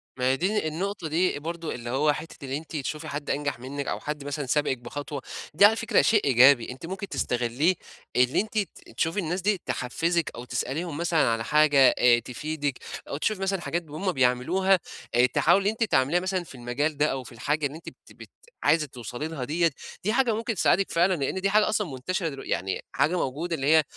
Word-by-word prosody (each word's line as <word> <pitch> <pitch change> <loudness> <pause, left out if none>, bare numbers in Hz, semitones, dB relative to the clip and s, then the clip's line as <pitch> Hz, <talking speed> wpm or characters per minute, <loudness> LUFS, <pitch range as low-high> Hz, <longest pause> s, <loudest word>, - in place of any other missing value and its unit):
ما 125 - -2
هي 135 - +1
دي 195 +2 0
النقطة 180 +3 -3
دي 165 0 +1
برضه 165 +1 -5
اللي 120 -1 -7
هو 145 +4 +2
حتّة 160 0 -9
اللي 135 +1 -2
أنتِ 160 +1 -9
تشوفي 155 +2 -4
حد 145 -1 -5
أنجح 145 -3 -1
منِّك 140 +3 -5
أو - - -2
حد 150 -1 -5
مثلًا 145 0 -3
سابقِك 135 0 +1
بخطوة، 145 +3 -6 0.3
دي 185 +7 +7
على 215 +2 +6
فكرة 230 +1 +2
شيء 215 -2 +3
إيجابي 130 -1 +6
أنتِ 130 +5 -9
ممكن 190 +3 -5
تستغلّيه، 125 +5 +1 0.4
اللي 125 +5 +3
أنتِ 220 +1 -6
ت 205 -3 -4
تشوفي 165 +5 0
الناس 180 +1 -2
دي 200 -1 +1
تحفّزِك، 165 +6 -1
أو 120 - -7
تسأليهم 145 +6 -3
مثلًا 170 0 +1
على 115 0 0
حاجة 145 -1 +5
آآ 120 -1 +6
تفيدِك، 145 +2 -4 0.3
أو 140 - -3
تشوفي 195 +5 -1
مثلًا 195 -1 -1
حاجات 170 0 -2
ب 155 - -18
هُم 185 +5 -1
بيعملوها 165 +8 +2 0.4
آآ 120 +1 +6
تحاولي 175 +10 +3
أنتِ 220 +2 -1
تعمليها 150 -4 +2
مثلًا 185 0 -2
في 160 - -13
المجال 130 +5 -2
ده 150 - +3
أو 135 -1 -3
في 115 - -12
الحاجة 145 +6 -1
اللي 140 +1 -3
أنتِ 165 - -9
بت - - -20
بت - - -13 0.3
عايزة 155 +1 +3
توصلي 125 +3 -6
لها 160 -5 -5
ديّة، 165 +5 +1 0.3
دي 215 +3 +1
حاجة 245 -2 +3
ممكن 225 +1 -2
تساعدِك 195 +1 +2
فعلًا 175 +3 +3
لإن 170 +3 -2
دي 195 - +2
حاجة 210 +1 +4
أصلًا 210 -2 0
مُنتشرة 165 +7 -2
دلو 135 -2 -8
يعني 95 +1 -2
حاجة 140 +7 +1
موجودة 165 +4 -2
اللي 135 -2 -2
هي، 160 +1 +6
155 Hz, 210 wpm, -26 LUFS, 135-180 Hz, 0.4 s, دي